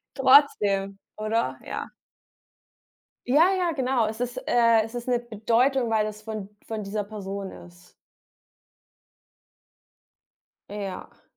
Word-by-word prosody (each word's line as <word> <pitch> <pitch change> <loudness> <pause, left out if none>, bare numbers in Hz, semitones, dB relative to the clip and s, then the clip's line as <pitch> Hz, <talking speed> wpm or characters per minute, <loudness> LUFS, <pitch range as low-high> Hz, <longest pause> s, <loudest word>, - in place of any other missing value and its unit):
trotzdem, 205 -8 +4 0.2
oder? 220 +2 -1
Ja. - - -5 1.4
Ja 320 +9 +5
ja, 350 -2 +1
genau. 260 -5 +1
Es 220 +1 -5
ist, 245 0 -3
äh 230 -2 +4
es 225 +2 -9
ist 240 +1 -5
'ne 245 -1 +2
Bedeutung, 235 +3 +1
weil 215 -1 +2
es 215 0 -8
von 215 -2 -6 0.2
von 220 -2 -4
dieser 205 +1 -3
Person 200 -2 -6
ist. 175 0 -15 2.8
Ja. 200 -3 -7
220 Hz, 110 wpm, -25 LUFS, 205-245 Hz, 2.8 s, Ja